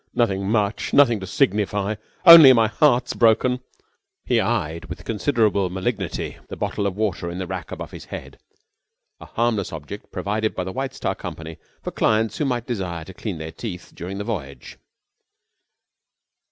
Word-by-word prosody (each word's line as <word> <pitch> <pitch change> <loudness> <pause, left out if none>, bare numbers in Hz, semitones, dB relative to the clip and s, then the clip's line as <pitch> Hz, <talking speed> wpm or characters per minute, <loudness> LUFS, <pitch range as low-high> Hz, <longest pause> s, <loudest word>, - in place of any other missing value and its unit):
Nothing 100 -5 +1
much. 105 -2 0
Nothing 120 -6 +5
to 95 - -7
signify. 105 -6 0 0.3
Only 165 -6 +11
my 115 -2 +4
heart's 125 +3 +2
broken." 120 +2 +3 0.7
He 120 -2 +2
eyed 85 -9 -2
with - - -9
considerable 105 -4 +1
malignity 95 +1 -3
the - - -7
bottle 100 - -2
of 100 0 -4
water 95 -5 -1
in 85 - -6
the 95 - -3
rack - - -6
above - - -7
his - - -10
head, - - -9 0.8
a - - -11
harmless 115 -4 -1
object 80 +6 -8
provided 110 +2 -2
by 90 - -2
the 95 +1 -6
White 135 0 -4
Star - - -2
Company 80 0 -8 0.3
for - - -4
clients 110 0 +1
who 150 - +1
might 120 -3 -1
desire 90 -9 -4
to 95 - -11
clean 95 -1 -5
their 80 +1 -6
teeth 90 -2 -7
during 95 +3 -6
the 105 - -3
voyage. 70 - -6
105 Hz, 165 wpm, -22 LUFS, 95-120 Hz, 0.8 s, Only